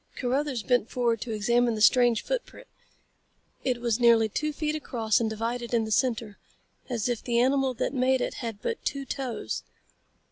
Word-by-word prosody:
Carruthers 260 -1 -1
bent 245 -2 +1
forward 235 -3 0
to 240 - -4
examine 235 +2 +2
the - - -4
strange 240 0 +4
footprint. - - -4 1.0
It 250 -2 0
was 235 -1 0
nearly 230 -2 +5
two 305 +8 -1
feet 300 +1 -2
across 230 -8 0
and 225 -2 0
divided 235 +2 -3
in 225 -1 +2
the 220 - -6
center, 225 -3 0 0.5
as 235 -3 -1
if 240 -2 -1
the 235 -1 +1
animal 265 +1 +2
that - - -2
made 260 0 +2
it - - -2
had 225 -4 -6
but 465 - -3
two 275 -1 -2
toes. 250 - -4
240 Hz, 175 wpm, -27 LUFS, 225-260 Hz, 1.0 s, nearly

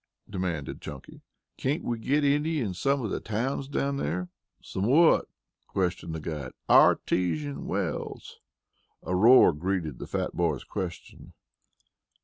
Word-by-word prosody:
demanded 90 -7 -4
Chunky. 75 -3 -10 0.4
"Can't 145 +6 -1
we 120 -1 -2
get 145 +6 +1
any 150 +3 +2
in 105 -8 -2
some 135 +9 0
of 105 - -3
the - - -1
towns 125 +5 -2
down 140 0 -1
here?" 90 +4 -2 0.3
"Some 95 +2 -3
what?" 160 +6 +5 0.4
questioned 90 -3 -2
the - - -4
guide. 75 -5 -5
"Artesian 75 -6 +3
wells." - - -4 0.6
A 90 - -2
roar 115 -1 +7
greeted 80 -3 -2
the - - -6
fat - - -3
boy's 80 -6 0
question. 90 -4 -7
95 Hz, 130 wpm, -27 LUFS, 80-135 Hz, 0.6 s, roar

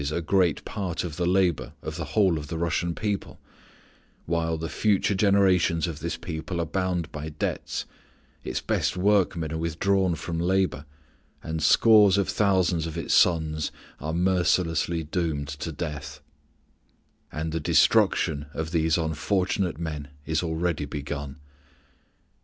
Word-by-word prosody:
_ 70 +1 -2
a 80 - -1
great 85 -1 +1
part 95 -4 -3
of 85 -4 -5
the 90 - 0
labor 90 -3 +1
of 80 - -5
the 85 +5 -6
whole 95 -6 +4
of 75 - -8
the 80 - -4
Russian 85 +1 -1
people, 105 -2 -3 0.9
while 80 -1 0
the 80 +1 -4
future 105 +2 +1
generations 95 -4 +3
of 80 -4 -5
this 80 0 -3
people 85 +1 -5
are 85 - 0
bound 90 -1 -2
by 75 +1 -5
debts, 75 0 -3 0.6
its - - -3
best - - 0
workmen 90 -5 +2
are 80 - -2
withdrawn 90 +3 +1
from 80 +1 -4
labor, 90 -5 0 0.6
and 80 0 -3
scores 105 +4 +6
of 100 - +1
thousands 95 -5 +2
of 80 +1 -6
its 85 - -1
sons 80 -3 +2 0.3
are 75 - -3
mercilessly 85 -2 +1
doomed 75 -3 -2
to 75 +3 -5
death; 75 -1 -6 1.1
and 80 +1 -3
the 80 - -1
destruction 75 0 +3
of 80 0 -3
these 80 -1 +2
unfortunate 90 +2 0
men 75 -3 -5 0.2
is 80 -1 0
already 80 -2 -1
begun. 70 0 -6
85 Hz, 145 wpm, -26 LUFS, 80-90 Hz, 1.1 s, scores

